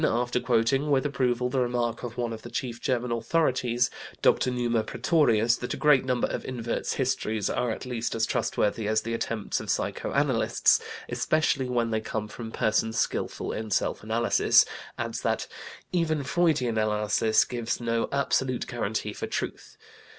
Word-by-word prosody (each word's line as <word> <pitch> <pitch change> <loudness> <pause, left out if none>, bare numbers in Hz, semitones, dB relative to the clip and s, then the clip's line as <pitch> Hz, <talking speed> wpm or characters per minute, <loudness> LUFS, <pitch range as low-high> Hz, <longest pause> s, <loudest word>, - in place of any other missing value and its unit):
619), 120 +2 +2
after 125 - 0
quoting 125 +5 +1
with 140 -1 +2
approval 125 -3 +1
the 130 +1 0
remark 120 -2 0
of 120 -2 -6
one 120 -2 -1
of 110 - -7
the 120 - -9
chief 120 -1 -4
German 125 -1 -1
authorities, 120 -1 +1 0.3
Dr. - - +4
Numa 120 -2 +1
Praetorius, 120 -9 +2
that 125 - -4
"a - - -8
great 150 -4 +4
number 125 -2 +1
of - - -4
inverts' 120 -2 -3
histories 110 -6 -1
are 125 - 0
at 110 - -3
the 130 - -7
least 115 -2 -2
as 115 - +2
trustworthy 105 +1 0
as 110 0 +1
the 115 - -3
attempts 115 -2 -2
of - - -8
psychoanalysts, - - +2 0.3
especially 145 -4 +1
when 120 -2 0
they 110 0 0
come 110 -1 -3
from 110 +1 -8
persons 110 +1 0
skillful - - -1
in 110 0 -4
self 100 - 0
analysis," 115 +2 +4 0.3
adds - - -3
that - - 0 0.5
"even 160 -4 0
Freudian 140 -7 +1
analysis 110 +1 +2
gives 120 -2 -3
no 115 -1 -1
absolute 130 -2 0
guarantee 110 -3 -3
for - - -5
truth. - - -5
120 Hz, 165 wpm, -27 LUFS, 115-130 Hz, 0.5 s, Dr